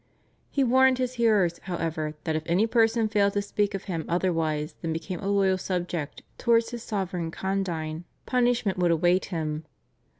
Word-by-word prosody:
He 275 Hz, -, +1 dB
warned 260 Hz, +1 st, +4 dB
his 255 Hz, -1 st, -1 dB
hearers, 200 Hz, -7 st, +3 dB
however, 160 Hz, -4 st, -3 dB
that 160 Hz, -, -1 dB
if 155 Hz, -, 0 dB
any 180 Hz, +6 st, +3 dB
person 225 Hz, -1 st, +3 dB
failed 205 Hz, -2 st, +2 dB
to 205 Hz, -, +1 dB
speak 205 Hz, 0 st, -1 dB
of 195 Hz, -, -5 dB
him 170 Hz, -5 st, -3 dB
otherwise 165 Hz, -4 st, 0 dB
than 165 Hz, -, -2 dB
became 165 Hz, +3 st, -4 dB
a 195 Hz, -, -4 dB
loyal 195 Hz, -2 st, +2 dB
subject 175 Hz, -5 st, -3 dB, 0.2 s
towards 230 Hz, -1 st, +3 dB
his 240 Hz, -1 st, -5 dB
sovereign 185 Hz, -6 st, -3 dB
condign 170 Hz, -3 st, -3 dB, 0.2 s
punishment 240 Hz, -6 st, +1 dB
would 175 Hz, -1 st, +3 dB
await 175 Hz, +3 st, +3 dB
him. 155 Hz, -3 st, -3 dB
185 Hz, 165 wpm, -26 LUFS, 165-220 Hz, 0.2 s, warned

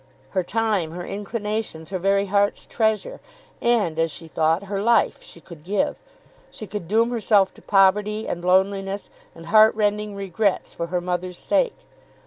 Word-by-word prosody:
Her 185 Hz, -, +1 dB
time, 205 Hz, -4 st, -1 dB
her 175 Hz, 0 st, -6 dB
inclinations, 210 Hz, -5 st, -4 dB
her 185 Hz, -, -2 dB
very 195 Hz, +2 st, +2 dB
heart's 200 Hz, +1 st, +1 dB
treasure, 220 Hz, -, -1 dB, 0.4 s
and, 215 Hz, -10 st, +1 dB
as 165 Hz, 0 st, +2 dB
she 165 Hz, +1 st, -8 dB
thought, 160 Hz, +3 st, +1 dB
her 200 Hz, 0 st, -3 dB
life, 230 Hz, 0 st, +2 dB
she -, -, -12 dB
could 165 Hz, -2 st, -13 dB
give. 195 Hz, +3 st, -1 dB, 0.5 s
She 215 Hz, -, -9 dB
could 205 Hz, -4 st, -6 dB
doom 225 Hz, +5 st, +2 dB
herself 210 Hz, -4 st, +2 dB
to -, -, -17 dB
poverty, 210 Hz, +2 st, +2 dB
and 175 Hz, -, -4 dB
loneliness, 195 Hz, +2 st, +1 dB, 0.2 s
and 165 Hz, -, -11 dB
heart 215 Hz, +2 st, +6 dB
rending 210 Hz, -1 st, 0 dB
regrets 200 Hz, +1 st, -1 dB
for 170 Hz, -, -4 dB
her 175 Hz, +1 st, -1 dB
mother's 180 Hz, 0 st, -3 dB
sake. -, -, 0 dB
200 Hz, 160 wpm, -23 LUFS, 180-215 Hz, 0.5 s, heart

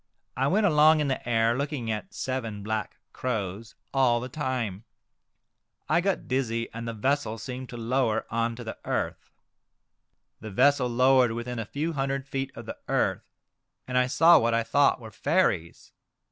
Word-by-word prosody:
I 135 Hz, -, +1 dB
went 205 Hz, +7 st, +2 dB
along 155 Hz, -2 st, +5 dB
in 150 Hz, -2 st, 0 dB
the 130 Hz, -2 st, -3 dB
air, 115 Hz, 0 st, +3 dB
looking 140 Hz, -4 st, -2 dB
at 110 Hz, -, -4 dB
seven 115 Hz, -6 st, -3 dB
black 110 Hz, -1 st, -3 dB, 0.2 s
crows 105 Hz, -3 st, -4 dB, 0.2 s
all 130 Hz, -3 st, +3 dB
the 125 Hz, +2 st, -6 dB
Crows. -, -, -30 dB
29 145 Hz, -4 st, -2 dB, 0.3 s
time. 105 Hz, -, -19 dB, 1.0 s
I 170 Hz, -, +3 dB
got 195 Hz, +1 st, -1 dB
dizzy, 115 Hz, -3 st, -1 dB
and 115 Hz, +1 st, -6 dB
the 115 Hz, -, -3 dB
vessel 130 Hz, 0 st, 0 dB
seemed 125 Hz, +3 st, -7 dB
to 120 Hz, -, -7 dB
lower 115 Hz, -1 st, 0 dB
on 115 Hz, +1 st, 0 dB
to 120 Hz, -, -8 dB
the 110 Hz, -, -7 dB
earth. -, -, -3 dB, 1.1 s
The 110 Hz, -, -8 dB
vessel 130 Hz, +5 st, +3 dB
lowered 125 Hz, 0 st, +4 dB
within 120 Hz, +1 st, -4 dB
a 115 Hz, -, -3 dB
few 155 Hz, +8 st, -3 dB
hundred 135 Hz, -1 st, -2 dB
feet 135 Hz, -1 st, -3 dB
of -, -, -9 dB
the -, -, -7 dB
earth, -, -, 0 dB, 0.6 s
and 125 Hz, -, -4 dB
I 125 Hz, 0 st, +4 dB
saw 165 Hz, +6 st, +6 dB
what 115 Hz, 0 st, +1 dB
I 115 Hz, -, +1 dB
thought 140 Hz, +4 st, +3 dB
were 110 Hz, -2 st, -10 dB
fairies. 85 Hz, -4 st, 0 dB
125 Hz, 175 wpm, -27 LUFS, 115-135 Hz, 1.1 s, saw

